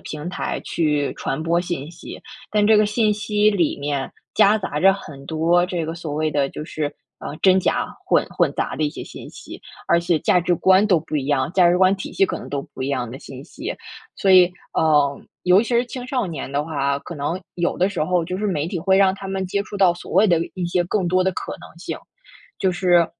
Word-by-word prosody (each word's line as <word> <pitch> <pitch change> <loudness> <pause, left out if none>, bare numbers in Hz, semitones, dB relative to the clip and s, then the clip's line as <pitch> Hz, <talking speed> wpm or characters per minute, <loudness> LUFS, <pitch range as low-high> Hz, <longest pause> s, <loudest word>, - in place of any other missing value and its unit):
平 155 +2 -6
台 185 - -3
去 150 -3 0
传 135 - -3
播 170 +1 +2
信 175 -5 -4
息。 170 - -10 0.3
但 210 -1 +2
这 220 0 +6
个 210 - +5
信 210 0 +1
息 210 0 +2
里 175 -9 0
面， 140 -1 -2 0.2
夹 210 +2 +5
杂 150 -7 -3
着 195 +1 +6
很 145 -8 -9
多 165 +3 +2
这 175 -3 -3
个 165 - -4
所 170 -3 -6
谓 155 +1 0
的 145 -2 0
就 150 - -7
是， 155 -1 -3 0.3
呃， 145 - -6
真 190 0 +5
假 - - 0 0.2
混 - - +2
混 - - +1
杂 - - -2
的 - - -2
一 150 - +1
些 - - -8
信 - - -10
息， - - -11 0.3
而 170 - +3
且 170 -1 +1
价 180 - +3
值 175 0 +1
观 190 +4 +4
都 180 -5 +4
不 155 0 -8
一 135 -2 -2
样， 140 0 0
价 180 -2 +5
值 180 - +2
观 190 +1 +5
体 200 - -7
系 195 - +3
可 - - -3
能 - - -9
都 140 - -2
不 - - -5
一 130 - -2
样 130 -4 -2
的 120 - -8
信 135 0 -10
息。 - - -6 0.4
所 195 - +1
以， 185 -1 +8 0.3
嗯， 145 -3 +2 0.2
尤 185 +3 +5
其 235 - -6
是 240 0 +2
青 250 0 -7
少 255 -5 -1
年 155 -6 -6
的 145 +1 -1
话， 140 -3 -1
可 170 - -8
能 150 +5 -3
有 175 -1 -1
的 185 - +3
时 195 -6 -2
候， 175 +1 +1
就 180 +2 -4
是 210 - -1
媒 160 -6 -1
体 180 +1 -3
会 190 +3 +2
让 190 -1 +4
他 195 - -8
们 190 0 -2
接 200 +2 -1
触 205 0 -8
到， 190 -3 +5
所 175 - -11
谓 195 +4 +5
的 175 -4 +3 0.2
一 185 - -3
些 175 +1 +1
更 185 0 -1
多 185 +1 +3
的 190 - +2
可 - - -5
能 - - -14
性。 - - -5 0.6
就 190 - +2
是 175 -2 +3
175 Hz, 260 characters per minute, -21 LUFS, 150-195 Hz, 0.6 s, 以